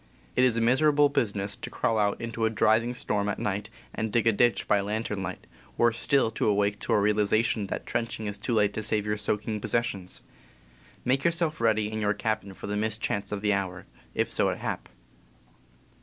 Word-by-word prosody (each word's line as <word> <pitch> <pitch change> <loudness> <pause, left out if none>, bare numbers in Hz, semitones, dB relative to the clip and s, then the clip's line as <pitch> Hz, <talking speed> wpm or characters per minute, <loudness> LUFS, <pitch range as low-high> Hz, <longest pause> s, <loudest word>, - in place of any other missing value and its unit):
It - - +4
is 120 -2 +3
miserable 145 +5 +4
business 100 -7 -1
to - - -6
crawl 115 -3 0
out 100 -1 +1
into 115 -1 -2
a - - +3
driving 110 +2 +2
storm 105 -4 -1
at 105 - -2
night 105 +1 -2 0.2
and 110 -1 -2
dig 115 0 +2
a 115 - +6
ditch 120 +3 +2
by 105 - +4
lantern 105 0 -2
light 95 0 -6 0.2
— - - -26
worse 115 -1 +3
still 135 -5 +3
to 115 - -1
awake 105 0 +1
to - - -1
a - - +4
realization 105 +1 +2
that - - -4
trenching 115 -2 -3
is 105 -1 -4
too 120 - -1
late 105 -1 +3
to 110 - -3
save 105 -1 0
your 105 0 -1
soaking 105 +1 -2
possessions. 100 -5 -2 0.8
"Make 135 +2 +2
yourself 170 -4 0
ready 110 -2 +2
in 110 0 -3
your 105 0 +1
cabin 110 -3 -2
for - - -9
the 105 - -2
mischance 105 -1 -1
of 105 -1 -3
the 105 -1 +2
hour, 95 -2 -3 0.3
if - - 0
so - - +2
it - - -2
hap." - - -4
110 Hz, 200 wpm, -27 LUFS, 105-115 Hz, 0.8 s, a